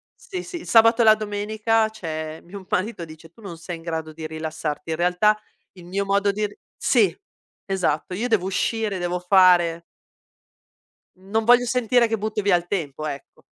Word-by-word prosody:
Sì, 365 -2 -7
sì, 365 - -7
il - - -12
sabato 230 +1 +5
e - - +4
la 215 0 +8
domenica, 215 +1 0
c'è 160 -6 -6
mio 195 +3 -9
m 190 - -15
marito 185 -1 -2
dice: 160 0 -14
"Tu 225 - -20
non 185 -5 -8
sei 165 +1 -7
in - - -14
grado 160 -2 -4
di 160 0 -6
rilassarti," 155 0 -5
in 160 - -2
realtà 180 +5 +2 0.3
il 180 -2 -14
mio 195 +3 -2
modo 200 +1 +2
di 210 +1 -2
ri 205 - -17 0.2
sì, - - +2 0.5
esatto, 180 -4 -1
io 220 +7 -2
devo 220 -6 +1
uscire, 210 +1 -1
devo 175 0 -2
fare 180 -2 +4 1.4
Non 200 +4 -2
voglio 245 +2 +5
sentire 245 -1 +2
che 225 0 -1
butti 215 +1 -2
via 200 -2 +3
il 175 0 -2
tempo, 155 -6 -3
ecco. 140 -3 -8
195 Hz, 185 wpm, -23 LUFS, 165-220 Hz, 1.4 s, la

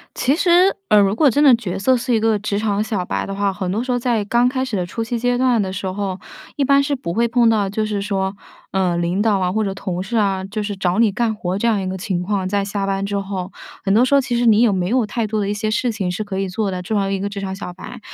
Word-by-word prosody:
其 270 +3 +2
实， 360 +3 +4
呃， 210 - +6
如 200 0 +3
果 280 +4 +4
真 290 +5 +2
的 270 -4 +8
角 195 -5 -3
色 255 +6 +3
是 245 0 -1
一 - - +3
个 220 -1 +2
职 205 0 -2
场 210 -1 0
小 210 -4 -2
白 - - -2
的 195 - -5
话， 200 0 0
很 185 -1 -4
多 220 +6 -1
时 255 - -2
候 245 - +1
在 235 -4 0
刚 240 +4 +2
开 260 0 -1
始 255 -5 -5
的 180 - -1
初 225 +6 -4
期 235 +1 -3
阶 245 +1 0
段 250 -3 +3
的 190 -1 -3
时 190 0 -5
候， 190 0 -3 0.4
一 285 - +1
般 280 +1 +4
是 280 0 -1
不 170 -9 -5
会 235 +2 +2
碰 235 0 +3
到， 210 -3 +2
就 215 +2 -2
是 205 -2 -2
说， 195 -1 -2 0.4
呃， 185 -3 +1
领 175 +4 0
导 215 -3 +2
啊、 180 -1 0
或 220 +2 0
者 195 -2 -1
同 185 -3 -4
事 210 +5 -4
啊， 195 -3 +1
就 205 +2 -4
是 205 0 -3
找 185 +1 0
你 225 -4 +4
干 225 0 0
活， 185 -3 -3
这 235 - +1
样 215 -3 +2
一 190 - -4
个 190 - -3
情 185 -2 -2
况， 190 -1 -1
在 200 0 0
下 200 0 -3
班 195 0 -1
之 200 0 -2
后。 195 -1 -5 0.3
很 195 - +2
多 230 +4 +5
时 270 - +2
候， 280 - +6
其 250 -2 -2
实 240 - +1
你 220 0 +5
也 235 -4 +4
没 180 -1 -1
有 240 +1 +1
太 230 +1 -2
多 215 0 -2
的 200 - -1
一 205 - -1
些 215 +1 -2
事 235 +2 0
情 195 -4 -2
是 210 +4 -3
可 195 -2 -4
以 195 -1 -1
做 200 +2 -2
的， 180 -1 -4
作 210 +3 -1
为 195 0 -1
一 195 - -2
个 200 - -2
职 200 0 -6
场 190 -1 -4
小 190 -2 -7
白。 185 - -10
205 Hz, 330 characters per minute, -20 LUFS, 195-235 Hz, 0.4 s, 的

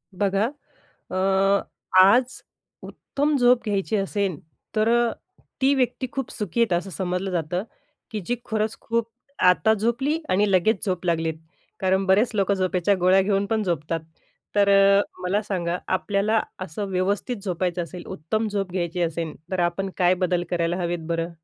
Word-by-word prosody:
बघा. 200 +2 +1 0.7
अ, - - -3 0.8
आज 240 +7 +4 0.4
उत्तम 290 +1 -2
झोप 245 -1 +4
घ्यायची 205 0 -1
असेल, 195 -4 -1 0.4
तर 215 +1 +3
अ, 235 0 +3 0.5
ती 270 +1 +4
व्यक्ती 260 0 0
खूप 270 -3 -4
सुखी 210 +2 -2
आहेत 230 -5 +3
असं 175 +3 0
समजलं 180 +3 -2
जातं, 175 +1 -1 0.5
की 215 -3 -3
जी 245 - 0
खरंच 220 0 -1
खूप 230 0 -1 0.4
आता 220 +4 +4
झोपली 235 +8 0
आणि 200 +2 +2
लगेच 190 +5 +2
झोप 185 -3 -2
लागलीत, 165 -1 0 0.5
कारण 190 0 +2
बरेच 205 +5 +4
लोकं 200 -1 +2
झोपेच्या 185 0 +1
गोळ्या 185 +2 +5
घेऊन 200 0 +1
पण 220 +1 0
झोपतात. 165 -3 -2 0.5
तर 200 -1 +4
अ, 200 0 +6 0.2
मला 195 +4 0
सांगा. 180 -4 -2
आपल्याला 200 +3 +1 0.2
असं 185 +2 -4
व्यवस्थित 200 +6 -1
झोपायचं 180 -2 -1
असेल, 175 +1 -8
उत्तम 215 +9 -2
झोप 200 -3 -2
घ्यायची 175 -1 -2
असेल. 165 -1 -2 0.2
तर 185 -1 -1
आपण 175 +3 -1
काय 180 0 +4
बदल 175 -1 0
करायला 170 0 0
हवेत 170 -2 -3
बरं? 165 0 -1
195 Hz, 155 wpm, -24 LUFS, 180-215 Hz, 0.8 s, अ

